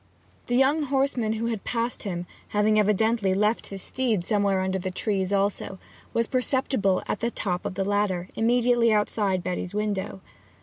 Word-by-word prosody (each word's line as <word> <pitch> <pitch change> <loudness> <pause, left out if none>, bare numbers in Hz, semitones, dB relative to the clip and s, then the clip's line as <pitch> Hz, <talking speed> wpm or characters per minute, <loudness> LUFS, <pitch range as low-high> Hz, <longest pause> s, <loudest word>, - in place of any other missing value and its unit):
The 245 - 0
young 270 +5 +4
horseman 265 -5 0
who 225 +1 -2
had 225 -3 -2
passed 235 0 -2
him, 180 -4 -4 0.2
having 215 +1 +2
evidently 210 -1 +2
left 210 +3 +1
his 195 -1 -7
steed 235 -8 -1
somewhere 200 -1 +1
under 190 0 -1
the 185 - -3
trees 190 0 -1
also, 200 -1 0 0.3
was 230 - +1
perceptible 255 -6 +1
at - - -2
the 235 - 0
top 185 -5 -3
of 195 - -6
the 195 - -1
ladder, 200 -3 0
immediately 240 0 +3
outside 210 -3 +1
Betty's 180 +1 -3
window. 200 - -2
210 Hz, 165 wpm, -26 LUFS, 190-235 Hz, 0.3 s, young